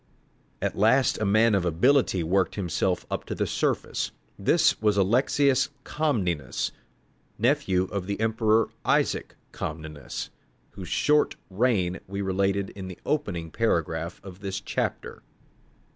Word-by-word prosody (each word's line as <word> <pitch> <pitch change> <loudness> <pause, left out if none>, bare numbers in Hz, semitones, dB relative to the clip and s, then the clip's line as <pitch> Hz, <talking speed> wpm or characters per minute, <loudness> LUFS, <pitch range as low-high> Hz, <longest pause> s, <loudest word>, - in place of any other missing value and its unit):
At - - -1
last 115 +6 +3
a 110 - 0
man 110 +3 +4
of 100 -3 +2
ability 95 - +3
worked 95 +3 +1
himself 90 -5 -1
up - - -2
to - - -4
the - - 0
surface. - - -1 0.3
This - - +3
was 105 -2 +2
Alexius 130 +6 +3
Comnenus, 90 - -1 0.7
nephew 115 -6 +2
of 95 0 -4
the 100 0 -3
emperor 110 0 +2
Isaac - - +1 0.2
Comnenus, 75 -4 -6 0.4
whose 95 -2 -8
short 150 0 +2 0.2
reign 95 -4 +1
we 100 +1 -3
related 95 +1 0
in 95 -2 -8
the 90 - -8
opening 100 - -2
paragraph 85 -6 -1
of 95 -1 -10
this 100 -1 -4
chapter. - - -3
100 Hz, 130 wpm, -26 LUFS, 90-115 Hz, 0.7 s, man